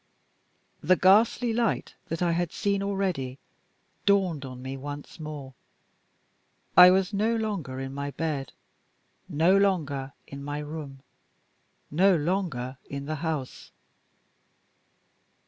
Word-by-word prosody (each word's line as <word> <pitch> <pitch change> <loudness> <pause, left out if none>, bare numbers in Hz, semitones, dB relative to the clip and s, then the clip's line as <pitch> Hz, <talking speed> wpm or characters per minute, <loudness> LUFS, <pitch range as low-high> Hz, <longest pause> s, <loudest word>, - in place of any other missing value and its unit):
The 185 +5 +4
ghastly 225 +6 +4
light 230 -1 0
that 165 +2 -2
I 175 - +2
had 170 0 0
seen 200 -1 0
already 190 -10 -2 0.7
dawned 185 -8 +2
on 130 -1 -8
me 130 +1 -5
once 145 +3 -8
more. 150 -4 -7 1.2
I 180 +1 +11
was 190 +2 +2
no 220 +3 +1
longer 200 -13 -3
in 135 0 -5
my 140 +1 -3
bed, 145 -3 -3 0.8
no 165 +4 +4
longer 155 -9 +1
in 140 0 -9
my 145 +1 -4
room, 150 -3 -7 0.9
no 185 +5 +5
longer 150 -7 -2
in 140 0 -5
the 155 +1 -3
house. 155 -6 -4
160 Hz, 115 wpm, -27 LUFS, 140-190 Hz, 1.2 s, I